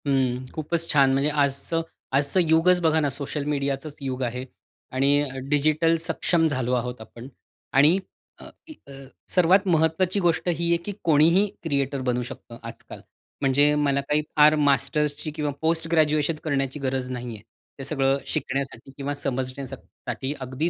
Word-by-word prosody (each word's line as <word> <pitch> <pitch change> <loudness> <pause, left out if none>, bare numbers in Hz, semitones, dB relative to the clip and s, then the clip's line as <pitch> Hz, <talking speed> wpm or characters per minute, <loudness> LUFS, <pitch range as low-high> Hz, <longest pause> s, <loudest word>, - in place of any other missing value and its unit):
हं, 130 -2 +1
खूपच 165 +2 -1
छान! 140 -3 +4
म्हणजे 140 +2 +2
आजचं 145 +3 0 0.4
आजचं 145 +6 +2
युगच 170 +3 +4
बघा 160 -1 +3
ना, 145 -2 +1
सोशल 140 +2 -3
मीडियाचंच 140 0 -2
युग 130 -1 -4
आहे 125 +1 -3 0.5
आणि 140 +2 +2 0.2
डिजिटल 155 +3 +2
सक्षम 165 0 +1
झालो 130 -4 -1
आहोत 125 -1 -2
आपण, 115 +3 -11 0.5
आणि 150 +7 +5 0.4
अ, - - -12 0.4
अ, - - -11 0.4
सर्वात 185 +2 +4
महत्त्वाची 170 +3 +2
गोष्ट 175 -2 +1
ही 170 0 0
आहे, 170 - +4
की 205 - -4
कोणीही 165 +6 +4 0.2
क्रिएटर 140 -3 -1
बनू 125 -1 0
शकतं 115 - -11
आजकाल; - - -11 0.4
म्हणजे 145 +2 +4
मला 140 -2 +1
काही 150 +2 0
फार 150 0 +6
मास्टर्सची 145 +1 +1
किंवा 150 -2 -1
पोस्ट 165 0 +1
ग्रॅज्युएशन 155 -1 +2
करण्याची 140 -2 -1
गरज 130 -1 -2
नाहीये 120 -2 -5 0.4
हे - - -5
सगळं 135 -1 +1
शिकण्यासाठी 135 -1 -3
किंवा 140 0 -3
समजण्यासाठी. 130 0 -5
अगदी 130 +5 -2
145 Hz, 145 wpm, -24 LUFS, 135-160 Hz, 0.5 s, फार